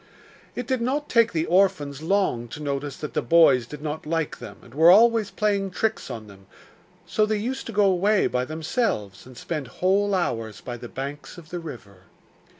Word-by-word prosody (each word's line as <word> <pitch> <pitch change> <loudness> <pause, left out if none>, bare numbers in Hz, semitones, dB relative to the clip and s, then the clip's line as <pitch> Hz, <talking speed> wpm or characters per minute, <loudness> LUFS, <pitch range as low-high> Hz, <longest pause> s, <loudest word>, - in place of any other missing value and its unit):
It 250 - -4
did 255 0 -1
not 280 +5 -1
take 230 -1 +4
the 160 -1 0
orphans 170 -7 +1
long 165 -9 0
to 120 - -9
notice 140 -1 -3
that 150 - -6
the - - 0
boys 140 -8 +5
did 150 +2 -9
not 155 0 -4
like 165 -1 -2
them, - - -9
and 120 - -16
were 160 +4 +6
always 225 +2 +5
playing 200 -2 0
tricks 220 +4 -2
on 110 -2 -6
them, 95 -2 -16 0.6
so 215 - +1
they 215 0 0
used 255 +6 -4
to - - -5
go 205 -1 +3
away 195 +2 +3
by 125 0 0
themselves 155 - -2
and 130 -2 -14
spend 150 -6 -4
whole 195 +7 +1
hours 115 - -2
by 120 - -6
the 120 0 -9
banks 140 +5 -7
of 165 -2 -13
the 175 - -4
river. 100 - -11
165 Hz, 195 wpm, -24 LUFS, 135-205 Hz, 0.6 s, were